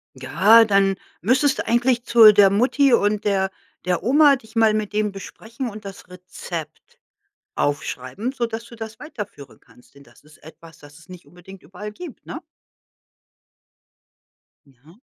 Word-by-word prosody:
Ja, 200 - +4
dann 195 -2 +2 0.3
müsstest 265 - +1
du - - -4
eigentlich 240 +1 +1
zu 225 -3 +7
der 200 -1 +5
Mutti 255 +6 +2
und 210 -2 +1
der 195 -2 0 0.4
der 180 -1 -1
Oma, 280 +4 +5
dich 225 -2 -16
mal 225 -1 +3
mit 215 -1 -3
dem 210 -1 -1
besprechen 225 +5 -8
und 210 -1 -11
das 195 0 -11
Rezept 175 -3 -10 0.6
aufschreiben, 145 - -3
sodass 230 -3 -4
du 235 - -14
das 220 0 -9
weiterführen 210 - -10
kannst, 125 - -24
denn 140 - -17
das 140 - -22
ist 150 0 -20
etwas, 160 0 -16
das 145 0 -16
es 160 - -20
nicht 180 -4 -13
unbedingt 180 +4 -15
überall 205 +3 -10
gibt, 325 +2 -12
ne? 315 - -7 2.3
Mhm. 145 - -23
205 Hz, 150 wpm, -21 LUFS, 175-230 Hz, 2.3 s, zu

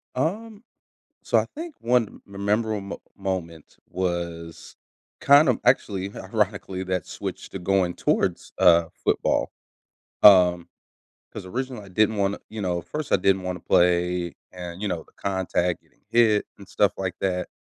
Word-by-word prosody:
Um, 210 - -3 0.6
so - - +2
I - - +1
think 325 0 -7
one 120 -2 0
memorable 105 +2 -1
mo 100 - -7 0.2
moment 90 -5 -5
was 85 -2 -4 0.4
kind 140 +1 +6
of 125 - +2
actually, 100 -6 +1
ironically, 100 -2 -2
that 90 -3 -2
switch - - -6
to 95 - -6
going 90 -1 +1
towards, - - -1
uh, 85 -1 +6 0.2
football, - - +1 0.7
um, 90 -4 +7 0.6
'cause 95 - -8
originally 125 0 -5
I - - -13
didn't 110 +3 +2
wanna 100 0 0
you 110 - -6
know, 90 -3 -1
first, 150 - -5
I - - +7
didn't 95 0 +2
wanna 90 0 -4
play 90 0 +2 0.2
and, 90 +1 -8
you 105 - -1
know, 85 -4 -3
the - - -26
contact, 95 -2 -1
getting - - -34
hit, 110 -3 +4
and 100 - -13
stuff 105 -1 +2
like 95 -2 -2
that, 90 -1 -1
95 Hz, 150 wpm, -24 LUFS, 90-110 Hz, 0.7 s, um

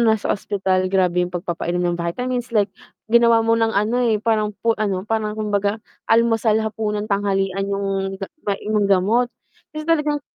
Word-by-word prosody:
nasa 215 - -5
ospital, 190 -2 0
grabe 180 -2 +2
yung 180 - -10
pagpapainom 175 0 -2
ng 175 -1 0
vitamins 245 +8 -2
like 205 -1 +3 0.4
ginawa 235 -1 +5
mo 230 0 +3
ng 225 -1 +1
ano, 230 +5 +1
eh, 215 -2 +1
parang 215 -2 +1
pu 230 +2 0
ano, 200 -3 -1
parang 215 -1 -1
kumbaga 205 0 -1 0.2
almusal, 225 -1 +3
hapunan, 215 -1 -3
tanghalian 195 -1 0
yung 195 -1 -2
ga 195 - -4 0.2
may 200 -1 -1 0.2
gamot. 210 +6 +2 0.4
Kasi 305 - -4
talagang 300 -3 +1
210 Hz, 155 wpm, -21 LUFS, 195-225 Hz, 0.4 s, ginawa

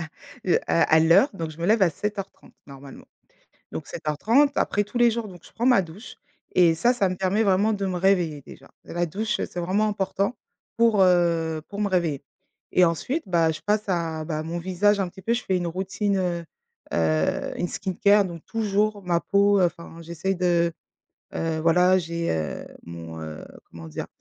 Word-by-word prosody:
à, 160 - -5 0.4
heu, 180 - +4
à 170 - +3
à 160 - +6
l'heure, 165 - +5
donc 165 -3 -4
je 155 - -13
me 170 - -2
lève 215 +1 +3
à 180 - +5
07:30 195 +4 -6
normalement. 140 -1 -12 0.7
Donc - - -6
07:30, 225 - +1
après 205 - +1
tous 210 +4 -6
les 240 -1 +5
jours, 230 -1 -3
donc 180 -4 -12
je - - -16
prends 235 - -3
ma 250 -6 +5
douche 185 +8 -11 0.4
et 170 -3 +5
ça, 235 +10 +3
ça 240 -6 +1
me 185 - -3
permet 190 +4 +1
vraiment 200 +2 +2
de 200 -1 -2
me 185 -2 -2
réveiller 175 -5 +1
déjà. - - -14
La 175 0 -2
douche 210 +7 -2
c'est 175 - -4
vraiment 195 +5 +1
important 200 +2 -1 0.4
pour, 230 -3 +4
heu, 170 -3 +2
pour 200 - -7
me 205 - +1
réveiller 165 -7 0 0.5
et 180 - +6
ensuite, 175 - -1
bah, 165 -3 +2
je 155 - -6
passe 210 0 0
à, 165 -3 -1
bah, 155 -1 -3
mon 165 +2 -4
visage 190 +4 +1
un 185 - -2
petit 190 - -14
peu. 225 +5 0
Je 240 - -2
fais 190 - 0
une 175 -1 -2
routine, 195 +4 -2
heu, 175 -2 -2 0.5
heu, 80 -1 0
une 175 - 0
skin 190 +2 -4
care. 205 0 +6
Donc, 170 -3 -8
toujours 210 -1 -1
ma 175 -2 +1
peau, 200 +4 +3
enfin, 170 -1 -2
j'essaie 170 +3 -3
de, 175 -1 +2 0.6
heu, 160 -1 -2
voilà 180 +3 +4
j'ai, 170 -1 -2
heu, 80 -1 -4 0.2
mon, 85 -1 -8
heu, 80 -1 -8 0.3
comment 80 -1 -10
dire? 75 - -6
180 Hz, 195 wpm, -24 LUFS, 165-205 Hz, 0.7 s, à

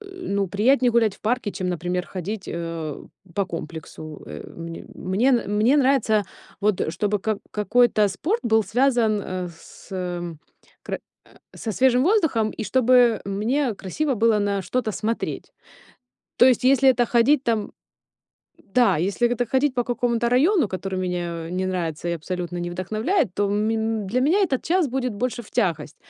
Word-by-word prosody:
ну, 365 - -3
приятнее 245 +7 +3
гулять 225 -4 +3
в - - -31
парке, 225 -1 -1
чем, 185 -1 -3
например, 180 +1 -2
ходить, 195 +2 -5
э, 165 -3 -5 0.3
по 200 -2 0
комплексу. 160 -2 -8
Э, 75 0 -8
мне 165 0 -8
мне 195 +8 0
н 240 -5 +1
мне 235 +7 +4
нравится, 255 -6 +3 0.4
вот, 210 -2 +1
э, - - 0
чтобы 205 +5 -1
как 215 +1 -2
какой-то 215 0 +3
спорт 350 - -1
был 220 -1 +3
связан, 230 0 +2
э, 185 -1 -4
с - - -16
м 175 -3 -4 0.4
кр - - -4 0.3
э, - - -23 0.3
со 220 - -4
свежим 255 +3 +3
воздухом, 315 - +2
и - - -6
чтобы 250 -1 +4
мне 225 +6 0
красиво 270 +10 -2
было 225 0 +3
на 200 -1 0
что-то 225 +2 -2
смотреть. 225 +3 -3 0.9
То - - +7
есть, 250 -2 +3
если 270 +1 +5
это 245 -2 +2
ходить 250 +5 +3
там 225 -3 0 1.0
Да, 245 -8 +5
если 195 +9 +1
это 245 - -1
так 245 -1 -2
ходить 265 0 +2
по 245 -1 0
какому-то 235 0 0
району, 310 - +4
который 190 0 -4
меня 175 -2 -3
не 185 +1 -1
нравится 175 -3 -3
и - - 0
абсолютно 175 +2 -4
не 175 0 -3
вдохновляет, 215 - -1
то 205 - +1
ме 210 +2 0 0.3
для 235 +7 0
меня 320 +10 +3
этот 280 -10 +1
час 345 -3 +1
будет 255 -1 -2
больше 240 +2 -2
в 210 - -17
тягость. 165 - -1
215 Hz, 170 wpm, -23 LUFS, 185-250 Hz, 1.0 s, То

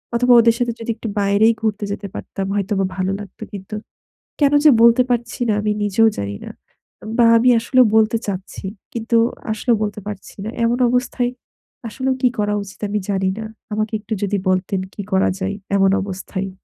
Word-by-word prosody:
অথবা 245 +1 +4
ওদের 230 0 +4
সাথে 240 -1 0
যদি 230 0 -3
একটু 225 - -7
বাইরেই 200 +3 +4
ঘুরতে 215 -2 -1
যেতে 200 0 -4
পারতাম 195 -1 -5
হয়তোবা 195 -1 0
ভালো 185 0 0
লাগতো 200 -3 -10
কিন্তু। 200 +2 -7 0.7
কেন 285 0 +4
যে - - +10
বলতে 235 +1 +6
পারছি 240 -1 -2
না - - +3
আমি 210 0 0
নিজেও 205 +2 +3
জানি 100 0 -4
না। - - -7 0.7
বা 240 - +6
আমি 250 +2 +4
আসলেও 255 +2 +4
বলতে 220 +1 +3
চাচ্ছি। 195 0 -5 0.3
কিন্তু 230 0 0 0.3
আসলে 220 +3 -1
বলতে 210 0 -3
পারছি 205 -2 -8
না। - - -3 0.2
এমন 235 +1 +1
অবস্থায় 250 0 0 0.6
আসলেও 260 +4 -1
কি 255 - +5
করা 210 0 +1
উচিত 195 - -13
আমি 210 +1 0
জানি 190 -1 +1
না। 220 - -5 0.3
আমাকে 215 +1 -2
একটু 215 +1 -5
যদি 205 0 0
বলতেন 185 +1 0
কি - - -6
করা 190 - +3
যায় 195 +1 -2 0.2
এমন 195 -1 +4
অবস্থায়? 195 0 -5
210 Hz, 180 wpm, -20 LUFS, 195-235 Hz, 0.7 s, যে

